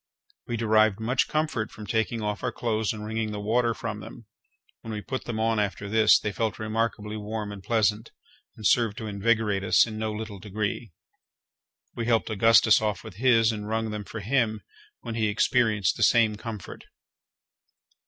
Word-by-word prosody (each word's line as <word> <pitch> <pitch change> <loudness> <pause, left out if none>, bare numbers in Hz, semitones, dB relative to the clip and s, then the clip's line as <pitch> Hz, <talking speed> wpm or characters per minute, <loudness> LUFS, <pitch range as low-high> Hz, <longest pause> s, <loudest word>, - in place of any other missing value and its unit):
We 120 -2 -2
derived 110 -2 +3
much 125 +4 +1
comfort 150 -8 -1
from 105 - -10
taking 110 +1 -1
off 105 -1 -2
our 125 - -1
clothes 110 -4 -1
and 105 -1 -6
wringing 110 0 -2
the 105 - -4
water 115 +2 +1
from - - -5
them. - - -11 0.6
When 115 - -7
we 105 - -3
put 130 +5 -5
them 115 -2 -4
on 115 0 +1
after 100 -1 -2
this, 110 +1 +5
they 105 - -3
felt 110 +2 -2
remarkably 110 -1 -2
warm 105 0 -4
and 100 -1 -8
pleasant, 110 +1 0 0.5
and 110 - -8
served 115 -1 +3
to 110 - -5
invigorate 105 -1 0
us - - +5
in 110 -2 -7
no 110 0 -2
little 105 -2 -6
degree. 105 +2 -4 1.0
We 115 -1 -4
helped 115 -1 +1
Augustus 110 +1 +5
off 105 -3 -2
with 105 -4 -11
his, 115 -2 +4
and 105 -1 -5
wrung 110 0 -1
them 105 -1 -4
for 105 +4 -7
him, 110 -1 0 0.4
when 115 - -6
he 110 -1 0
experienced 105 -2 +2
the - - -5
same 110 0 +4
comfort. 105 -2 -8
110 Hz, 180 wpm, -26 LUFS, 105-115 Hz, 1.0 s, this